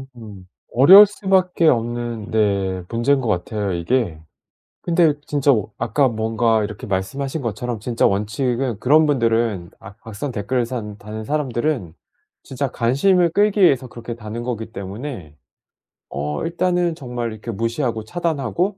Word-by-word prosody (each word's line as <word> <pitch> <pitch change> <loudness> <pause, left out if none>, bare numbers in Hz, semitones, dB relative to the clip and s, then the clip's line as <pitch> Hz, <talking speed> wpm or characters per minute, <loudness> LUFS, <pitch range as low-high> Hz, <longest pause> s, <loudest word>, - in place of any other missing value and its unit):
음. 105 -5 -11 0.3
어려울 190 - +9
수밖에 190 -4 +1
없는 120 -3 -1
네 100 -4 0
문제인 130 +4 +1
것 120 - -3
같아요 100 +1 -2
이게. 85 -1 -1 0.6
근데 165 -3 +3
진짜 145 -1 +2 0.3
아까 130 +5 +2
뭔가 110 -1 +1
이렇게 105 +4 -6
말씀하신 135 +10 -3
것처럼 115 0 -4
진짜 115 +2 0
원칙은 115 +4 -1
그런 155 +6 +4
분들은 115 -9 0
악 100 +2 -13
악성 110 +6 -5
댓글을 120 +2 -1
사는 105 -5 -6
다는 110 +1 -7
사람들은 130 - -2 0.5
진짜 135 +1 -3
관심을 170 +10 +2
끌기 205 +2 +2
위해서 135 -8 +4
그렇게 120 0 -8
다는 115 +1 -7
거기 115 -2 -4
때문에 100 - -7 0.7
어 75 +2 -3
일단은 175 0 0
정말 120 -4 -5
이렇게 110 +2 -7
무시하고 115 +1 -2
차단하고 170 - -2
120 Hz, 315 characters per minute, -20 LUFS, 105-140 Hz, 0.7 s, 어려울